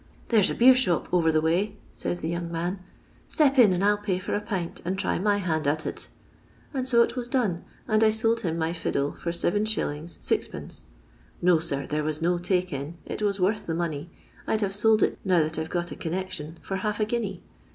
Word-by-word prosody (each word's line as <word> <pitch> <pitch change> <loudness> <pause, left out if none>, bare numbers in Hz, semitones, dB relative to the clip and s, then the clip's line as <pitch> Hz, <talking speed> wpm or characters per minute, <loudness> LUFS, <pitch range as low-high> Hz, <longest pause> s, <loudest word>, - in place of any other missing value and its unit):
' - - -27
There 225 -3 +5
's - - +5
a - - -2
beershop 250 -8 +5
over 165 -2 +4
the 155 0 +2
way,' 170 +6 +1 0.2
says 175 - -3
the 160 - -2
young 170 0 -3
man, 175 +3 -2 0.2
' - - -31
step 280 -4 +3
in, 220 -6 +8
and 180 +1 0
I 205 - +5
'11 205 0 0
pay 190 -3 0
for 185 - -4
a 205 - 0
pint, 190 -6 -4
and 185 +3 -2
try - - 0
my 205 +2 +2
hand 160 -6 -1
at 155 +2 0
it.' - - -5 0.6
And 260 -1 -2
so 235 -2 +6
it - - -3
was 245 -1 -3
done, 210 -10 0 0.2
and 215 -1 +3
I 220 - +6
sold 225 +1 +1
him 165 -2 -2
my 165 0 0
fiddle 145 -4 -1
for 170 - -5
7r. 175 +3 +1 0.6
6d. - - -3 0.6
No, 175 -2 +5
sir, 140 -4 -2
there 150 0 -1
was 155 0 -2
no 175 +1 +1
take 180 -1 0
in; 140 +5 -5
it - - -5
was 200 -1 0
worth 205 +3 0
the 165 - -1
money. 165 -2 -3 0.4
I - - +2
'd - - -4
have 195 -2 0
sold 220 +2 +3
it - - 0
now 180 -4 +3
that 155 0 -3
I - - 0
've - - -12
got 175 -1 -2
a - - -5
connection 170 -2 -4
for 195 - -3
half 210 +2 -2
a 215 - +2
guinea. 210 -5 -3
185 Hz, 235 wpm, -26 LUFS, 165-210 Hz, 0.6 s, in